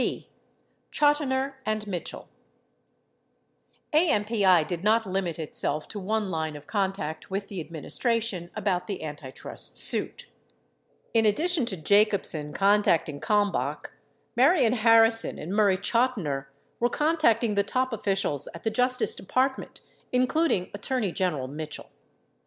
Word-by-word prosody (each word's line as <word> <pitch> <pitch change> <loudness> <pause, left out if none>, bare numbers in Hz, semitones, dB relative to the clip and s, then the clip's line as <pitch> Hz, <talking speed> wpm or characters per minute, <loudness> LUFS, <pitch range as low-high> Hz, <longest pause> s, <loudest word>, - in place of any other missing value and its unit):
17 - - -1
b. - - -25 0.6
Chotiner 280 -2 +1
and 215 -2 -2
Mitchell 180 -5 -5 1.7
AMPI 210 - +3
did 175 +1 -4
not 220 +2 +3
limit 185 -4 -2
itself 155 -1 -2
to 210 - -6
one 210 0 -1
line 160 -2 -2
of 145 0 -10
contact 190 -6 -3
with 195 +1 -4
the 185 -5 -5
adminis 160 -1 -4
tration 230 -8 0
about 185 -4 -1
the 195 -5 -5
antitrust 145 - -7
suit; 60 - +1 0.9
in 225 -1 +4
addition 305 - +2
to 190 - -1
Jacobsen 195 -4 +2
contacting 195 -6 +2
Kalmbach, 205 +2 0 0.4
Marion 260 -2 +4
Harrison 225 -1 +4
arid 155 - -7
Murray 200 -2 +3
Chotiner 200 - 0 0.3
were 240 - +2
contacting 245 -8 +2
the 200 - +3
top 255 +5 -1
officials 195 -9 -1
at 170 - -10
the 220 - 0
Justice 250 +2 +1
Department, 260 +7 -2 0.3
including 255 - +1
Attorney 210 -1 -2
Gen 180 0 0
eral 130 -3 -4
Mitchell. 150 +2 -8
205 Hz, 130 wpm, -26 LUFS, 170-235 Hz, 1.7 s, in